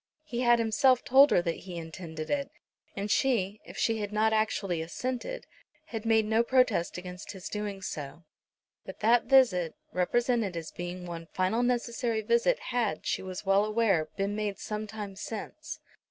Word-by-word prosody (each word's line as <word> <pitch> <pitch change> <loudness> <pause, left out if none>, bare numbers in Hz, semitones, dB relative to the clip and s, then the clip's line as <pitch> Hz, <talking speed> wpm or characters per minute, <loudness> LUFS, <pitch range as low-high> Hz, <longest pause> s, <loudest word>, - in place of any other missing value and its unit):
He 245 -6 -5
had 240 -1 +5
himself 245 +3 +3
told 275 +3 +7
her 175 - +3
that 170 -2 -1
he 180 -2 -6
intended 160 -1 -6
it; 280 -1 0 0.5
and 200 +1 -3
she, 215 -6 +1
if - - -11
she 225 -1 +1
had 205 -1 -3
not 220 +1 +2
actually 200 -5 0
assented, 255 - -4 0.4
had 225 -6 -5
made 220 -1 +4
no 220 +2 +3
protest 235 -9 +2
against 180 +1 -7
his 190 -1 -8
doing 205 -2 -4
so. 145 0 -6 0.6
But - - -10
that 235 +2 +4
visit, 235 - +4 0.2
represented 225 0 +1
as 165 -1 -6
being 175 +1 -6
one 165 -1 -7
final 185 +7 0
necessary 240 -2 0
visit, 235 - +2 0.2
had, 225 -10 0
she - - 0
was 185 +1 -6
well 195 +1 +4
aware, 210 -7 +1
been 200 +1 -1
made 210 -2 -2
some 215 0 -4
time 205 -2 -7
since. 225 +10 -6
210 Hz, 170 wpm, -29 LUFS, 185-235 Hz, 0.6 s, told